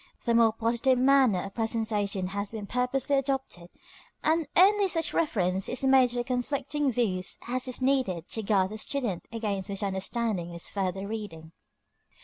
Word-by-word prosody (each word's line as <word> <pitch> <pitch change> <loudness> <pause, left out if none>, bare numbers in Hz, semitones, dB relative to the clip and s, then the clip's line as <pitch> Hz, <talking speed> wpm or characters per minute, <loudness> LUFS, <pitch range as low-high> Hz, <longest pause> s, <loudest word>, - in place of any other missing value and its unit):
The 235 - +2
more 230 -1 +5
positive 235 +3 +1
manner 255 -7 +4
of 195 - -8
presentation 215 -4 -1
has 200 +1 -4
been 220 -2 -6
purposely 250 +5 0
adopted, 265 -10 -3 0.5
and 320 0 +2
only 400 +2 +6
such 330 -3 -1
reference 190 - 0
is 255 - 0
made 265 -1 +5
to 240 0 -2
conflicting 270 +3 -1
views 200 -6 -1
as 255 +2 -1
is 255 0 -3
needed 255 -11 +1
to 220 - -1
guard 195 -3 +2
the 215 - -6
student 235 -9 -2
against 205 -5 -3
misunderstanding 195 0 -2
in 175 - -9
his 170 - -6
further 195 -1 -2
reading. 200 -7 -7
230 Hz, 155 wpm, -28 LUFS, 195-260 Hz, 0.5 s, only